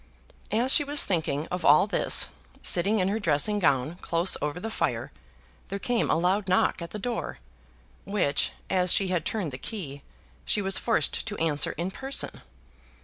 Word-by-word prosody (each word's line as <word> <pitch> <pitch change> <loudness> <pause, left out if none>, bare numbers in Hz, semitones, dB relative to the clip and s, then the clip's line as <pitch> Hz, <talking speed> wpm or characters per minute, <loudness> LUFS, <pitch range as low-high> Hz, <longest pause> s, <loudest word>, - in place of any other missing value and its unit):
As 240 +5 +2
she 295 - +5
was 290 0 +5
thinking 160 -4 -1
of 180 -1 -4
all 150 +5 +6
this, 200 -4 +3 0.3
sitting 200 +5 +3
in 185 -2 +1
her 215 +3 -1
dressing 200 +3 +1
gown 145 -1 +1
close 170 +2 +2
over 150 +3 -3
the 225 +4 -5
fire, - - -2 0.6
there 200 - -4
came 235 +3 0
a - - +3
loud 185 +4 0
knock 185 -1 +2
at 170 - -6
the - - -6
door, 235 +3 -4 0.7
which, 190 -8 0 0.2
as 180 -2 +2
she 195 -2 +3
had 175 -4 -1
turned 195 -9 -3
the 130 - -8
key, 145 -11 -7 0.4
she - - 0
was 195 -1 0
forced 230 - 0
to 210 - -4
answer 155 -2 0
in 175 +3 -4
person. 270 +6 -2
185 Hz, 175 wpm, -26 LUFS, 165-210 Hz, 0.7 s, all